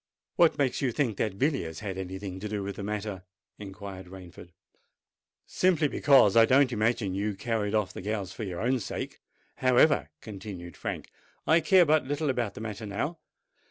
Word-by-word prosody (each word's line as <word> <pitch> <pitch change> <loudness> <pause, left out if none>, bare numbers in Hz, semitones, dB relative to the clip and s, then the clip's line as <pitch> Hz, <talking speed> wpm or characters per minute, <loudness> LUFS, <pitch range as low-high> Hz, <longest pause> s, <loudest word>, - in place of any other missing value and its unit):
"What 170 -2 +4
makes 135 -3 0
you 130 -3 +1
think 115 -5 -1
that 105 -4 -1
Villiers 120 - -1
had 100 -3 -4
any 95 0 -5
thing 95 -1 -6
to 105 +2 -5
do 105 -1 -3
with 100 0 -5
the - - -5
matter?" 105 -2 -4 0.4
inquired 95 -2 -8
Rainford. 90 -1 -12 1.0
"Simply 175 -5 +2
because 135 -8 +5
I 115 - +8
don't 130 +2 +4
imagine 110 -3 0
you 100 +1 -2
carried 105 0 -1
off 105 -3 0
the - - -7
gals 100 -2 -3
for - - -8
your 90 -4 -4
own 125 +3 +1
sake. 105 - -6 0.4
However," 130 +4 +4
continued 95 -5 -8
Frank, - - -5 0.3
"I 160 +2 +5
care 185 +1 +5
but 155 -3 +2
little 145 0 0
about 120 -6 -2
the - - -7
matter 110 -1 -5
now. 150 +12 -3
105 Hz, 180 wpm, -28 LUFS, 95-130 Hz, 1.0 s, I